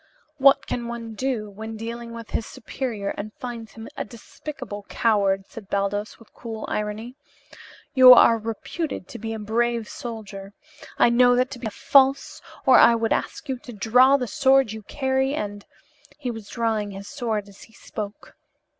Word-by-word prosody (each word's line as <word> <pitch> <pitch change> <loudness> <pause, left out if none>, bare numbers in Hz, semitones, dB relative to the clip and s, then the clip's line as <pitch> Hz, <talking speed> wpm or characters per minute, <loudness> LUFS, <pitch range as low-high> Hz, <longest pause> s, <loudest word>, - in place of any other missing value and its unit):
"What 275 0 +5
can 240 -1 -3
one 235 -1 -6
do 235 -2 -2
when 220 +2 -8
dealing 235 +1 -6
with 230 -1 -9
his 225 - -2
superior 235 -5 -4
and 215 +1 -5
finds 235 -3 -7
him 225 0 -9
a - - -3
despicable 235 0 -8
coward?" 200 -4 +1
said 210 -4 -11
Baldos, 200 +1 -2
with 230 - -20
cool 225 -2 -7
irony. 210 +3 -4 0.8
"You 255 -2 +9
are 230 -1 +6
reputed 225 - -5
to 240 - -8
be 225 +1 -5
a 225 - -3
brave 230 +1 -1
soldier. 205 -4 -8 0.4
I - - +5
know 245 +1 +5
that 255 +2 +1
to 255 - -7
be 235 - -4
false 270 +5 +3 0.2
or 260 - +7
I 235 - +7
would 225 -1 +1
ask 315 - -3
you 260 -2 -3
to 245 - -11
draw 250 +6 +5
the 255 - -2
sword 265 +1 +3
you 220 0 -7
carry 265 +3 -1
and 205 -4 -5 0.2
" 290 -1 -34
He 260 -5 -3
was 225 -3 -9
drawing 220 -3 -1
his 200 0 -9
sword 225 -7 -3
as 200 -1 -16
he 225 - -15
spoke. 210 -2 -8
230 Hz, 175 wpm, -24 LUFS, 210-255 Hz, 0.8 s, You